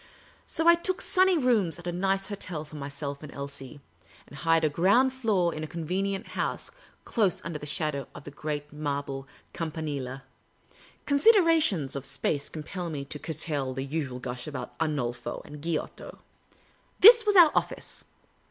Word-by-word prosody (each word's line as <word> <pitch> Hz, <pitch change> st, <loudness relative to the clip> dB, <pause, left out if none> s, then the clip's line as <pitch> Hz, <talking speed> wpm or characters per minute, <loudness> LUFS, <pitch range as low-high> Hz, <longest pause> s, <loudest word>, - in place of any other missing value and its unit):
So 325 Hz, -, 0 dB
I 340 Hz, -, +10 dB
took 360 Hz, +2 st, -1 dB
sunny 375 Hz, -1 st, +3 dB
rooms 225 Hz, -, +2 dB
at 175 Hz, -, -11 dB
a 175 Hz, -, -1 dB
nice 195 Hz, +2 st, 0 dB
hotel 185 Hz, -6 st, -5 dB
for 155 Hz, -, -13 dB
myself 140 Hz, 0 st, -5 dB
and 150 Hz, -2 st, -9 dB
Elsie, 140 Hz, -1 st, -8 dB, 0.5 s
and -, -, -14 dB
hired 165 Hz, +2 st, +2 dB
a -, -, +5 dB
ground 200 Hz, -, +3 dB
floor 210 Hz, -9 st, +1 dB
in 155 Hz, -, -5 dB
a -, -, -4 dB
convenient 190 Hz, +6 st, -3 dB
house, -, -, -3 dB, 0.3 s
close 205 Hz, -6 st, +1 dB
under 165 Hz, -3 st, -4 dB
the 150 Hz, -, -7 dB
shadow 145 Hz, -2 st, -2 dB
of -, -, -9 dB
the 145 Hz, -, -9 dB
great 150 Hz, 0 st, -5 dB
marble 140 Hz, -2 st, -4 dB, 0.3 s
Campanile. 145 Hz, -5 st, -4 dB, 0.8 s
(Con.siderations 305 Hz, -, +4 dB
of 140 Hz, -1 st, -3 dB
space 135 Hz, +2 st, -1 dB
compel 170 Hz, +3 st, -6 dB
me 140 Hz, -3 st, -5 dB
to 150 Hz, +1 st, -7 dB
curtail 145 Hz, -5 st, -3 dB
the 135 Hz, +1 st, -3 dB
usual 140 Hz, -3 st, -3 dB
gush 125 Hz, 0 st, -6 dB
about 150 Hz, -, -6 dB
Arnolfo 125 Hz, -7 st, -2 dB
and 150 Hz, 0 st, -10 dB
Giotto.) 165 Hz, 0 st, -4 dB, 0.8 s
This 460 Hz, +3 st, +10 dB
was 415 Hz, -2 st, +2 dB
our 345 Hz, -4 st, +9 dB
office. -, -, -3 dB
155 Hz, 160 wpm, -28 LUFS, 140-195 Hz, 0.8 s, I